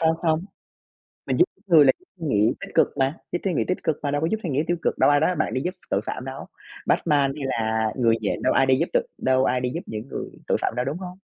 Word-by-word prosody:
Không 160 0 +3
không. 160 +1 +1 0.8
Mình - - 0
giúp 355 - +7 0.2
người 160 -5 +7
là - - +6 0.3
suy 165 - -5
nghĩ 105 -4 +3
tích - - -9
cực - - +5
mà, 135 +4 +1
giúp 175 - 0
suy 190 - +1
nghĩ - - +1
tích 185 - 0
cực 155 - +1
mà 145 - -1
đâu 145 0 0
có 160 - +1
giúp 220 - +1
suy 170 - -3
nghĩ 145 +2 +1
tiêu 175 - +1
cực, - - 0
đâu - - +5
ai 145 0 +4
nói 160 - +3
với 180 - -2
bạn 155 - -1
đi 130 - 0
giúp 180 +2 -2 0.2
tội 100 - +2
phạm 130 - -4
đâu? 135 +1 -7 0.4
Batman 140 -3 +2
hay 140 -3 -3
là 110 -3 0
Người 115 -3 +3
Nhện 105 - -2
đâu - - +3
ai 135 - +4
đi 130 0 +4
giúp 165 - 0
được - - +2
đâu 130 0 +2
ai 125 0 +1
đi 125 0 -1
giúp 170 - -2
những 110 +4 -6
người - - -5 0.2
tội - - +1
phạm - - 0
đâu, 125 - 0
đúng 145 +6 -3
hông? 180 0 -8
145 Hz, 290 wpm, -24 LUFS, 130-165 Hz, 0.8 s, giúp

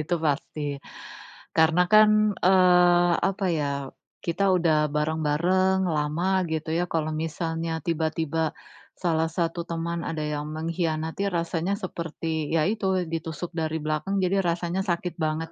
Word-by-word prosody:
itu 165 +3 -1
pasti, 145 -2 -2 0.7
karena 160 +2 +4
kan, 215 +1 +5
eee, 180 -1 +5 0.2
apa 195 0 -3
ya, 150 -2 0 0.6
kita 195 +3 +1
udah 155 -3 +2
bareng-bareng, 160 +5 +1
lama, 170 +4 0
gitu 160 0 -2
ya. 175 +1 0
Kalau 155 -1 -1
misalnya 165 +1 -3
tiba-tiba 160 -1 -1 0.4
salah 165 -2 0
satu 170 +1 -2
teman 170 0 -3
ada 155 -2 -3
yang 150 0 -3
mengkhianati, 160 +3 -2
rasanya 175 +2 -1
seperti 165 -5 -4
ya 160 -1 +2
itu 190 -3 0
ditusuk 165 +1 -5
dari 160 -1 -2
belakang. 155 +6 -2
Jadi 195 +1 +2
rasanya 175 +1 -1
sakit 175 -2 -2
banget 155 +1 -1
165 Hz, 130 wpm, -26 LUFS, 155-180 Hz, 0.7 s, kan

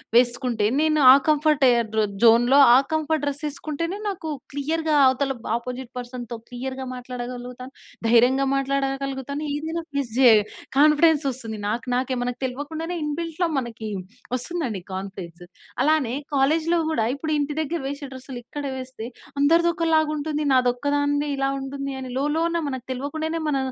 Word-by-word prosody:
వేసుకుంటే, 240 -2 +2 0.2
నేను 310 -1 +2
ఆ - - +8
కంఫర్ట్ 305 -1 +3
ఏ - - +6 0.3
ర 220 - +4 0.2
జోన్‌లో 240 +4 +6 0.2
ఆ - - +8 0.2
కంఫర్ట్ 315 -1 0
డ్రెస్ 285 +1 -3
వేసుకుంటేనే, 310 +5 -4
నాకు 340 -5 -5 0.2
క్లియర్‌గా 310 +2 0
అవతల 270 +1 +1
బ్ - - -7
అపోజిట్ 250 +1 -7
పర్సన్‌‌‌తో 245 -1 -6
క్లియర్‌గా 260 +2 -5
మాట్లాడగలుగుతాను. 250 0 -7 0.4
ధైర్యంగా 245 +4 +4
మాట్లాడగలుగుతాను. 275 +1 -2
ఏదైనా 320 +3 -3
ఫేస్ 275 -5 -2
జేయ 245 -4 +8 0.4
కాన్ఫిడెన్స్ 305 +1 +5
వస్తుంది 230 -4 -7
నాకు 230 +2 -2
నాకే. 255 +1 0
మనకు 245 0 -3
తెల్వకుండానే 310 +6 -4
ఇన్‌బిల్ట్‌లో 330 +3 -2
మనకి 230 -3 -6 0.5
వస్తుందండి 255 - -3
కాన్ఫిడెన్స్. 185 -2 -7 0.4
అలానే 290 -5 +2 0.2
కాలేజ్‌లో 315 +5 +2
కూడా, 270 -8 +1
ఇప్పుడు 310 +2 -4
ఇంటి 290 +1 -1
దగ్గర 330 +3 -2
వేసే 280 +1 -5
డ్రెస్సులు 260 -1 -8
ఇక్కడ 290 +2 -6
వేస్తే, 255 -3 -7 0.3
అందరిది 335 +4 +4
ఒకలాగా 320 -3 +2
ఉంటుంది. 300 0 -2
నాది 255 -1 +4
ఒక్కదానిదే 285 +2 0
ఇలా 270 0 +1
ఉంటుంది 275 +1 -5
అని, - - -6
లోలోన 320 +5 0
మనకు 260 -3 -5
తెల్వకుండానే 315 +5 -3
మన, 290 -2 +1
275 Hz, 140 wpm, -24 LUFS, 250-310 Hz, 0.5 s, ఆ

